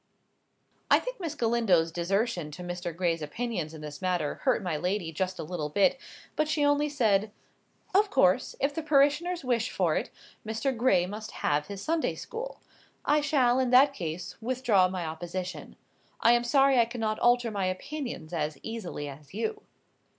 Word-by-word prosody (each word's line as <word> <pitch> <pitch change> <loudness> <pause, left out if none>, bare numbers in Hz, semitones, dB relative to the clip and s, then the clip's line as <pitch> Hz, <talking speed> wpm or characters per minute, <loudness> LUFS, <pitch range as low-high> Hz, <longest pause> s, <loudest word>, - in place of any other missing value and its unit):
I - - +7
think - - -5
Miss 330 -4 -4
Galindo's 225 - +2
desertion 180 0 -1
to 180 - -8
Mr. 175 0 -4
Gray's 170 -3 0
opinions 175 0 -3
in 160 -1 -10
this 150 -1 -8
matter 180 -5 -1
hurt 255 -6 +2
my 175 -4 -1
lady 180 +1 -1
just 185 +3 -2
a - - -4
little 155 -2 -4
bit; 230 - +3 0.4
but 305 - +1
she 305 -1 +1
only 290 +1 +2
said— 215 -7 +2 0.6
"Of 410 +2 +4
course, 250 - +3
if 280 +1 +1
the 325 - -3
parishoners 310 +3 +2
wish 235 -2 +1
for - - +1
it, - - -1 0.3
Mr. 225 +5 -1
Gray 225 -7 +3
must 215 +3 -6 0.2
have 150 0 +1
his 200 -1 -7
Sunday 325 0 0
school. 475 +2 -7 0.4
I 295 +1 +3
shall, 260 -4 +3
in 260 -1 +1
that 270 +3 +6
case, 170 - -5
withdraw 230 -6 +3
my 180 -2 -4
opposition. 175 +3 -5 0.4
I 230 - +5
am 240 0 +4
sorry 270 +1 +4
I 235 - +6
cannot 225 -2 -2
alter 240 -1 +3
my 200 -2 -1
opinions 185 - -5
as 150 -3 -2
easily 210 -10 -5
as 140 +3 -11
you." 425 - -2
220 Hz, 170 wpm, -28 LUFS, 175-270 Hz, 0.6 s, I